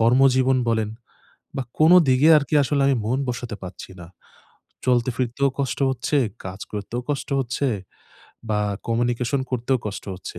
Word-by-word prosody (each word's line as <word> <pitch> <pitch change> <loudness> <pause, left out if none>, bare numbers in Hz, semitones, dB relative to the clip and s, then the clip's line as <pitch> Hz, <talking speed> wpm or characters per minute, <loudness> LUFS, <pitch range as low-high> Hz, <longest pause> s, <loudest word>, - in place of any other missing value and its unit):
কর্মজীবন 130 +2 +4
বলেন 110 -2 +1 0.7
বা 135 - -1 0.2
কোনো 165 +4 +7
দিকে 130 +5 +5
আরকি 145 +1 -3
আসলে 140 +1 +1
আমি 135 -2 +3
মন 130 +4 0
বসাতে 120 -3 -4
পারছি 90 0 -9
না। 85 - -9 0.8
চলতে 125 -1 +2
ফিরতেও 130 +2 0
কষ্ট 130 -3 -1
হচ্ছে, 130 +3 -1 0.3
কাজ 95 +2 -7
করতেও 105 +4 -4
কষ্ট 140 - -3
হচ্ছে, 130 +2 -1 0.8
বা 105 -1 +1 0.3
কমিউনিকেশন 120 +3 0
করতেও 125 +1 0
কষ্ট 100 - -5
হচ্ছে, 90 - -9
125 Hz, 145 wpm, -23 LUFS, 115-135 Hz, 0.8 s, কোনো